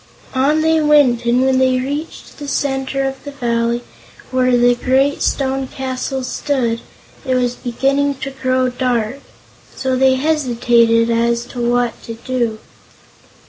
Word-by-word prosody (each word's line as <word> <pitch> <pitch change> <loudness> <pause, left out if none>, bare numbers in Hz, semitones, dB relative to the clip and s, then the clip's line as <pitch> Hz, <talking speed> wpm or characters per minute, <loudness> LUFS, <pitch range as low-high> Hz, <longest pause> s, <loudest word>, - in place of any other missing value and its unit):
On 285 +4 +2
they 320 0 +3
went, 285 -6 +4
and 245 +2 +3
when 260 -1 +2
they 260 -1 +3
reached 285 +7 -6
the 290 - -6
center 270 -1 -1
of 270 0 -6
the 285 - -7
valley, 235 -3 -1 0.5
where 255 -1 +3
the 245 0 +4
great 265 +4 +1
stone 270 -1 0
castle 265 0 -4
stood, 250 -3 -1 0.4
it 260 -2 0
was 245 -1 +1
beginning 275 +4 0
to 270 +1 -6
grow 255 -1 0
dark. 250 -1 -1 0.6
So 260 -1 -1
they 260 0 +4
hesitated 240 -5 +2
as 235 +1 +1
to 245 - -4
what 240 0 0
to 230 - -6
do. 235 -2 -2
255 Hz, 140 wpm, -17 LUFS, 240-270 Hz, 0.6 s, went